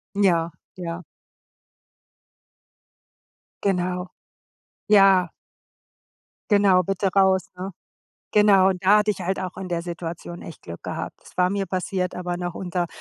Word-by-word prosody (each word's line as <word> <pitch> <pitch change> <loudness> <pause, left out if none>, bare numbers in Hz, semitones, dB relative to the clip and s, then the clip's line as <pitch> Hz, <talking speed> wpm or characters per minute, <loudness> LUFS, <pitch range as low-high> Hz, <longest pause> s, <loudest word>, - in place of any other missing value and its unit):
Ja, 170 -5 +2 0.2
ja. 175 -1 -5 2.6
Genau. 180 -1 0 0.8
Ja. 195 -4 +6 1.2
Genau, 195 -3 +5
„bitte 195 +2 -1
raus“, 190 -1 +3
ne? 190 +2 -5 0.6
Genau, 200 -2 +5
da 190 +3 +4
hatte 210 0 +2
ich 195 - -4
halt 190 +2 -1
auch 185 -1 -5
in 190 -1 -5
der 170 -1 -2
Situation 170 0 -6
echt 165 - -11
Glück 85 0 -9
gehabt. - - -5
Es - - -18
war 180 0 +3
mir 200 0 -1
passiert, 185 0 -2
aber 180 -1 -3
noch 175 -1 -4
unter 180 -2 -2
185 Hz, 125 wpm, -24 LUFS, 175-195 Hz, 2.6 s, Ja